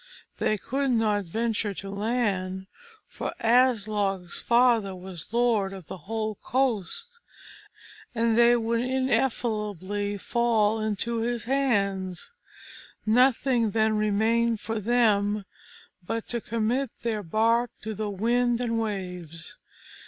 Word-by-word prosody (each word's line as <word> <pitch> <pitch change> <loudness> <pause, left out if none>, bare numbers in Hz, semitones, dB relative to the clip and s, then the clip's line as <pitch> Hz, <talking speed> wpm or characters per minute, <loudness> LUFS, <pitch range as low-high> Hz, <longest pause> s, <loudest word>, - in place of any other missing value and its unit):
They 215 - +1
could 270 +7 -2
not 215 -4 +1
venture 220 +2 -2
to 195 - -7
land, 200 -3 -1 0.4
for - - -5
Aslog's 210 -6 +1
father 235 -5 +3
was 180 -1 -9
lord 230 -5 +2
of 190 -3 -9
the 190 - -8
whole 220 -2 -2
coast, 270 - -1 1.0
and 230 -1 +2
they 235 +1 +6
would 230 0 0
infallibly 210 -6 -1
fall 225 0 +1
into 220 +2 -2
his 235 0 -1
hands. 200 -9 -1 0.7
Nothing 245 0 +3
then 220 +1 +2
remained 220 +2 +2
for 225 +1 -3
them 210 -2 +2 0.6
but 225 +5 -4
to 235 -1 -2
commit 230 +5 -1
their 225 -3 -1
bark 225 +6 +2
to 220 0 -4
the 215 0 -3
wind 240 +4 +1
and 230 -2 -1
waves. 180 -6 -5
220 Hz, 115 wpm, -26 LUFS, 200-235 Hz, 1.0 s, they